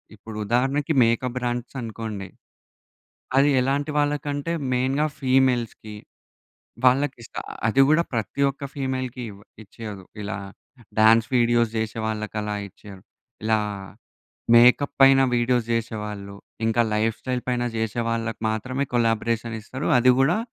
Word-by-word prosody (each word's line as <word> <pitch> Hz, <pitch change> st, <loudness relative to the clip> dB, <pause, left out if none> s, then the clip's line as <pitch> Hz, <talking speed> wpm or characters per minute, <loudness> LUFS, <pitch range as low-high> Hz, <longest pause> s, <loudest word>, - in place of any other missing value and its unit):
ఇప్పుడు 110 Hz, +1 st, -10 dB
ఉదాహరణకి 135 Hz, +7 st, +1 dB
makeup 120 Hz, +2 st, 0 dB
brands 120 Hz, +1 st, -3 dB
అనుకోండి. 110 Hz, -3 st, -6 dB, 1.1 s
అది 140 Hz, +2 st, +5 dB
ఎలాంటి 140 Hz, +4 st, 0 dB
వాళ్ళకంటే 145 Hz, +1 st, -1 dB, 0.2 s
మెయిన్‌గా 135 Hz, +4 st, +1 dB
ఫీమేల్స్‌కీ. 125 Hz, -5 st, +1 dB, 0.9 s
వాళ్ళకిస్తారు. 125 Hz, -2 st, 0 dB, 0.2 s
అది 135 Hz, +5 st, +4 dB
గూడా 155 Hz, +2 st, +4 dB
ప్రతి 115 Hz, +4 st, -2 dB
ఒక్క 140 Hz, +1 st, -8 dB
ఫీమేల్‌కీ 130 Hz, -2 st, -3 dB
ఇవ 100 Hz, -, -13 dB, 0.3 s
ఇచ్చేయదు. 105 Hz, -1 st, -9 dB, 0.2 s
ఇలా 100 Hz, -1 st, -4 dB, 0.6 s
డాన్స్ 110 Hz, +1 st, +6 dB
వీడియోస్ 120 Hz, -1 st, +3 dB
చేసే 110 Hz, 0 st, -3 dB
వాళ్ళకి 110 Hz, 0 st, -4 dB
అలా 105 Hz, 0 st, -3 dB
ఇచ్చేయ్యరు. 100 Hz, -1 st, -14 dB, 0.4 s
ఇలా 110 Hz, 0 st, +2 dB, 0.9 s
మేకప్ 125 Hz, +4 st, +6 dB
పైన 135 Hz, 0 st, +7 dB
వీడియోస్ 120 Hz, 0 st, +1 dB
చేసేవాళ్ళు. 105 Hz, -3 st, -4 dB, 0.3 s
ఇంకా 115 Hz, +1 st, +2 dB
లైఫ్‌స్టైల్ 115 Hz, +4 st, -1 dB
పైన 125 Hz, -1 st, 0 dB
చేసే 110 Hz, +1 st, -1 dB
వాళ్ళకి 115 Hz, -1 st, -3 dB
మాత్రమే 130 Hz, +5 st, -2 dB
కొలాబరేషన్ 115 Hz, 0 st, 0 dB
ఇస్తారు. 130 Hz, +6 st, -5 dB
అది 125 Hz, +1 st, +5 dB
గూడా 145 Hz, +9 st, +3 dB
120 Hz, 115 wpm, -24 LUFS, 110-130 Hz, 1.1 s, పైన